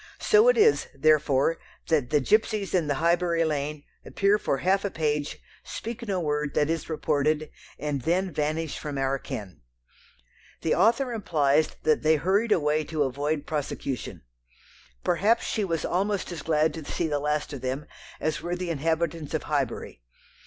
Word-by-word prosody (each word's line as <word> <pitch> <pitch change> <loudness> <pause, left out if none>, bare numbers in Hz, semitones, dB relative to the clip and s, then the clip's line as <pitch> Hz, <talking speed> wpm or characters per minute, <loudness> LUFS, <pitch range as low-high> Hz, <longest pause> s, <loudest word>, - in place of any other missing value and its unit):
So 430 +2 +5
it - - +5
is, 440 0 +4
therefore, 155 +1 +3 0.3
that 150 -7 +2
the 150 0 +3
gipsies 215 - +1
in 175 -5 +2
the 145 - +1
Highbury 170 +1 +2
lane 150 -1 -2 0.2
appear 200 +1 +2
for 140 - 0
half 190 +6 +1
a 200 - 0
page, 150 -4 -1 0.3
speak 235 +1 -6
no 195 -2 0
word 150 -3 -1
that 150 +1 +2
is 165 -1 -3
reported, 155 -1 0 0.3
and 145 -2 -2
then 180 +5 0
vanish 155 +1 -2
from 145 -2 -5
our 135 0 0
ken. 95 - -7 1.0
The 160 - +2
author 235 +6 +3
implies 155 -8 +1
that 155 -1 +3
they 155 +1 +4
hurried 195 +8 +1
away 155 -3 +2
to 155 -2 0
avoid 145 +3 -2
prosecution. 140 -4 -4 0.8
Perhaps 205 +7 +2
she 215 - -1
was 165 -6 -1
almost 195 +1 -1
as 170 - -5
glad 155 0 +2
to 160 - -7
see 170 - -2
the 145 -2 0
last 150 +1 -1
of 135 - -6
them 130 +3 -3 0.3
as 155 0 -1
were 175 +2 -2
the 180 -1 -3
inhabitants 160 0 -1
of - - -2
Highbury. - - -2
155 Hz, 165 wpm, -26 LUFS, 145-180 Hz, 1.0 s, So